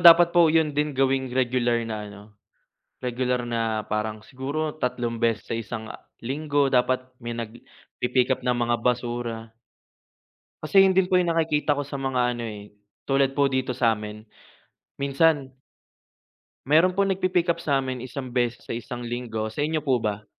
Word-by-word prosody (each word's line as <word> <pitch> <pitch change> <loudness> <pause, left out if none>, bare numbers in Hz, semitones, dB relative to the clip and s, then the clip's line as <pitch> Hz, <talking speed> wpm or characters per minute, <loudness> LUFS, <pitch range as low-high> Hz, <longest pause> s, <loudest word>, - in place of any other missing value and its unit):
dapat 170 0 +8
po, 170 -2 +6
'yon 155 -2 +3
din 150 -1 -1
gawing 135 -1 +2
regular 120 -2 +1
na 110 -1 -4
ano, 100 0 -12 0.8
regular 125 0 -1
na, 115 -2 -1
parang 110 0 -3
siguro, 150 +5 -4
tatlong 120 -3 -2
beses 115 -4 +1
sa - - 0
isang, 110 0 -5
uh, - - -8 0.2
linggo, 145 +2 0
dapat 130 0 +2 0.2
may 120 -1 -5
nagpi-pick 120 +2 -3
up 130 - +1
ng 125 - +3
mga 120 0 +1
basura. 120 -2 -2 1.1
Kasi 195 +6 +6
'yon 190 -1 +4
din 190 -1 +4
po 185 - +4
'yong 175 -2 +1
nakikita 150 -2 +2
ko 145 - -2
sa 140 0 -6
mga 125 -2 0
ano 120 - -5
eh, 105 -1 -9 0.4
tulad 135 -1 +3
po 140 -1 +4
dito 130 -1 -1
sa'min, 110 -3 -1 0.8
minsan 140 0 +2 1.1
Meron 170 +6 +4
po 200 - +4
nagpipick 185 -2 +1
up 170 - -11
sa'min 135 -4 -1
isang 130 0 -6
beses 120 -2 -1
sa - - -4
isang 120 +1 -6
linggo, 110 -2 -4
sa 145 - -3
inyo 155 0 -1
po 130 -4 +2
ba? 105 0 -2
130 Hz, 160 wpm, -25 LUFS, 120-145 Hz, 1.1 s, dapat